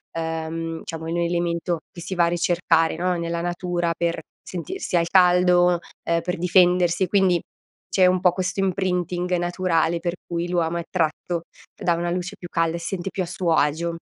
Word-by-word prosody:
Ehm, 165 0 -3
diciamo, 160 -1 -6
è - - -3
un 170 - -1
elemento 170 0 0
che 180 - -11
si 185 +2 -5
va 175 - +3
a - - +2
ricercare, 170 -1 +2
no, 180 +2 0
nella 170 0 -2
natura 175 0 -1
per 170 -1 -1 0.2
sentirsi 185 - -4
al 170 0 +1
caldo, 180 -1 +5 0.2
ehm, 170 0 +1
per 180 +1 -3
difendersi. 180 0 +3
Quindi, 190 -2 +3 0.5
c'è 185 - +4
un 185 0 +3
po' 180 -1 +3
questo 185 +1 -2
imprinting 180 -1 -1
naturale 175 -1 +1
per 175 +1 -2
cui 170 0 -2
l'uomo 170 -1 0
è 170 - -1
attratto 170 0 -2 0.3
da 175 - +1
una 175 +1 -1
luce 180 +3 -3
più 175 - -8
calda 165 -1 0
e - - -4
si 170 +3 -3
sente 185 +1 -4
più 190 - -2
a - - -3
suo 175 -1 -1
agio. 165 +3 +1
175 Hz, 185 wpm, -23 LUFS, 170-180 Hz, 0.5 s, caldo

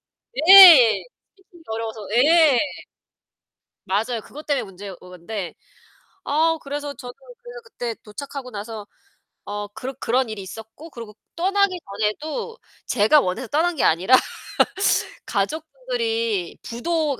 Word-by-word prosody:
아는데 320 +8 +1 0.5
예. - - -12 0.3
스피킹이 370 -3 -21
어려워서 225 0 -5 0.2
예. 300 -1 +5 1.3
맞아요. 220 +4 -1
그것 300 +2 -12
때문에 285 -2 0
문제인 195 0 -10
건데. 180 +1 -7 0.7
아 320 +3 +1
그래서 285 +1 -5
저도 245 0 -10 0.3
그래서 485 0 -10
그때 240 - -6
도착하고 270 +4 -8
나서 215 -1 -8 0.6
어 205 0 -5
그 260 +4 -6
그런 255 0 -1
일이 215 -2 -6
있었고 225 - -11
그러고 230 -7 -11 0.2
떠나기 380 +1 +1 0.2
전에도 315 - -3 0.3
제가 245 +9 +3
원해서 185 +7 -4
떠난 330 +6 0
게 - - 0
아니라 185 +11 +4 1.1
가족분들이 450 - -3
부도 305 +5 -2
265 Hz, 275 characters per minute, -22 LUFS, 215-330 Hz, 1.3 s, 예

